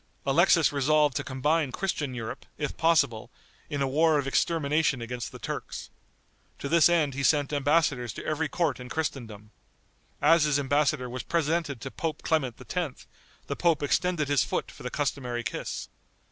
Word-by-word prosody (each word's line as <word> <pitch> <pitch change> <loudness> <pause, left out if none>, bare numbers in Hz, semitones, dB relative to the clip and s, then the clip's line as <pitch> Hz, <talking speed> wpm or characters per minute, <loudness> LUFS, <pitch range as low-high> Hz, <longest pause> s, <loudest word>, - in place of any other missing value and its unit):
Alexis - - +4
resolved 145 0 +3
to - - -1
combine 145 +2 0
Christian 150 -8 -2
Europe, 115 -2 -6
if 150 - -3
possible, 140 -9 +2 0.4
in 145 -3 -1
a - - +1
war 155 +3 +3
of 140 - -1
extermination 150 -1 +1
against 120 +1 -5
the - - -9
Turks. - - -6 0.7
To - - -5
this 170 +3 +5
end 160 -5 +2
he 140 - -3
sent 145 0 +2
embassadors 145 -4 +2
to - - -8
every 155 0 -1
court 155 -7 0
in 125 0 -8
Christendom. 115 -9 -4 0.7
As 160 +1 +5
his 150 -2 +2
embassador 145 -2 +1
was 125 +1 -5
presented 160 -4 -1
to 135 - -6
Pope 160 -3 -4
Clement 135 -8 0 0.2
X., 170 -7 -3 0.4
the - - -3
pope 165 -4 +2
extended 170 0 +1
his 145 -3 +3
foot - - -3
for - - -14
the 125 - -4
customary 125 -4 -2
kiss. 120 - -4
145 Hz, 165 wpm, -27 LUFS, 130-160 Hz, 0.7 s, this